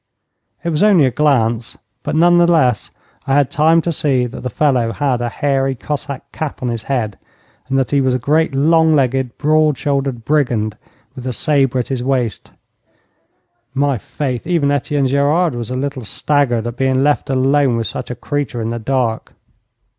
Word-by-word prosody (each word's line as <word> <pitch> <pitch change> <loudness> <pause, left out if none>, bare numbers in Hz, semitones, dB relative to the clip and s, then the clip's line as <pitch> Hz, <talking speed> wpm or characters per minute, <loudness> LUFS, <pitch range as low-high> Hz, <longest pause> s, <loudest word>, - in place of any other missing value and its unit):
It 170 - -1
was 155 -2 -1
only 200 -8 +5
a 130 - +1
glance, 120 -4 0 0.2
but, - - -3
none 175 +2 +5
the 175 0 +4
less, 130 -9 +2 0.4
I 135 - +2
had 145 -2 +2
time 160 +2 +3
to 170 - -1
see 145 -6 +1
that 120 - -7
the 125 - -3
fellow 125 -3 +1
had 135 -4 -1
a 120 - -1
hairy 135 0 0
Cossack 140 +1 -5
cap 155 -4 -5
on 125 - -1
his 115 -2 -3
head, 115 -5 -3 0.5
and 135 - +1
that 135 -2 0
he 140 -1 +3
was 130 -1 +1
a - - +2
great, 150 +4 +1
long 160 +2 +4
legged, 130 -3 0
broad 155 -1 +2
shouldered 135 -5 -2
brigand, 120 -8 0 0.4
with 130 -1 -7
a 125 - -2
sabre 135 -2 +1
at 125 - -2
his 130 -3 -2
waist. 125 -4 -2 1.3
My 140 -3 +1
faith, 130 +1 -4
even 165 -6 +1
Etienne 145 0 0
Gerard 145 +5 +2
was 120 -2 -5
a 125 - -3
little 135 -1 -3
staggered 120 -1 0
at 120 0 -5
being 130 0 +1
left 145 -1 +1
alone 135 -1 +2
with 115 - -2
such 130 - -5
a 125 - -4
creature 135 -1 -3
in 115 0 -2
the 120 - -3
dark. 120 -1 -2
135 Hz, 185 wpm, -17 LUFS, 125-150 Hz, 1.3 s, only